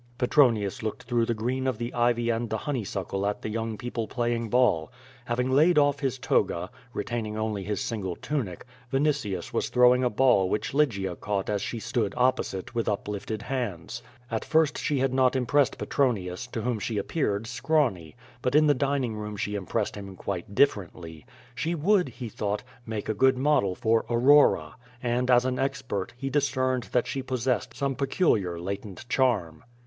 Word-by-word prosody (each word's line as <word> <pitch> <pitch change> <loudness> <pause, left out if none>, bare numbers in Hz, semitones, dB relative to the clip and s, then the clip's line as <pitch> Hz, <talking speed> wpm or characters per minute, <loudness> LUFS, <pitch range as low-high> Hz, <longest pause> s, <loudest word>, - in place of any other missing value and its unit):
Petronius 120 -7 +3
looked 110 +3 -4
through 120 -1 0
the 115 - 0
green 130 +4 -1
of 130 -4 0
the 120 +1 -4
ivy 120 0 +2
and 115 0 -2
the 110 - -1
honeysuckle 100 -8 -3
at 105 - -3
the - - -3
young 110 0 -3
people 115 0 -4
playing 120 -2 -1
ball. 115 -10 +2 0.3
Having 125 +2 -1
laid 155 +5 +5
off 145 -1 +4
his 135 -2 -1
toga, 125 - 0 0.2
retaining 110 -2 -3
only 110 -2 -2
his 105 +1 -2
single 95 -6 -3
tunic, 115 - -4 0.3
Vinitius 135 - 0
was - - 0
throwing 125 +1 +5
a 125 - +3
ball 115 -5 +3
which 105 - -2
Lygia 100 -11 +1
caught 100 +2 -2
as 100 -1 0
she 115 - -4
stood 105 -2 -1
opposite, 125 -6 0
with 115 -2 0
uplifted 105 +1 -3
hands. 120 -4 -4 0.3
At 110 - -1
first 160 -2 +2
she 145 - 0
had 135 0 +1
not 130 0 +3
impressed 130 +2 +2
Petron 130 -5 +1
ius, 90 -1 -6
to 115 - -4
whom 120 -3 -1
she 105 +2 -3
appeared 105 -2 -1
scrawny. 125 - 0 0.3
But 125 +2 0
in 155 0 +6
the 145 - +5
dining 135 -4 0
room, 105 -1 -5
she 105 +1 -2
impressed 105 +2 -2
him 100 -2 -8
quite 100 +1 -5
differently. 85 - 0 0.3
She 160 +8 -2
would, 180 +4 +2
he 125 - -7
thought, 105 -1 -3 0.2
make 110 -2 -4
a 110 - 0
good 130 +5 +3
model 130 -9 +2
for 115 +3 +2
Aurora, 120 - +4 0.3
and, 125 +1 0
as 125 0 +5
an 130 -1 -1
expert, 135 -8 -2
he 135 +1 -4
dis 145 0 +2
cerned 130 -2 -1
that 125 - +1
she 135 - -3
possessed 130 -1 -1
some 140 -1 -1
peculiar 125 - +1
latent 100 +4 -6
charm. 105 - +1
120 Hz, 180 wpm, -27 LUFS, 105-130 Hz, 0.3 s, in